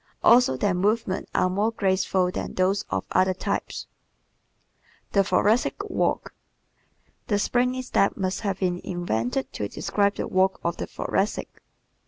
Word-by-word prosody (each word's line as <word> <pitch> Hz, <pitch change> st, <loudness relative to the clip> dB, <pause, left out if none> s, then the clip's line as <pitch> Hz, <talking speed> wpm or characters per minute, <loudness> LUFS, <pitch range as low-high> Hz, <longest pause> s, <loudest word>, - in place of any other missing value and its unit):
Also 240 Hz, -, +5 dB
their 195 Hz, +8 st, +1 dB
movements 200 Hz, +2 st, 0 dB
are -, -, +3 dB
more 200 Hz, +4 st, +1 dB
graceful 190 Hz, -3 st, +1 dB
than -, -, -5 dB
those 190 Hz, +2 st, +1 dB
of 95 Hz, 0 st, -2 dB
other 185 Hz, 0 st, +3 dB
types. -, -, -3 dB, 1.3 s
The 200 Hz, -, +4 dB
Thoracic 210 Hz, +6 st, +2 dB, 0.2 s
Walk -, -, 0 dB, 0.9 s
¶ -, -, -44 dB
"The 205 Hz, -, +2 dB
springy 250 Hz, +4 st, +1 dB
step" 200 Hz, -5 st, +1 dB
must 185 Hz, -1 st, -2 dB
have 200 Hz, -3 st, -1 dB
been 180 Hz, -2 st, -1 dB
invented 135 Hz, -7 st, -2 dB
to 105 Hz, -, -3 dB
describe 200 Hz, -, 0 dB
the -, -, -3 dB
walk 190 Hz, +1 st, +2 dB
of 170 Hz, 0 st, -1 dB
the -, -, -4 dB
Thoracic. 195 Hz, +2 st, -2 dB
190 Hz, 145 wpm, -25 LUFS, 180-205 Hz, 1.3 s, Also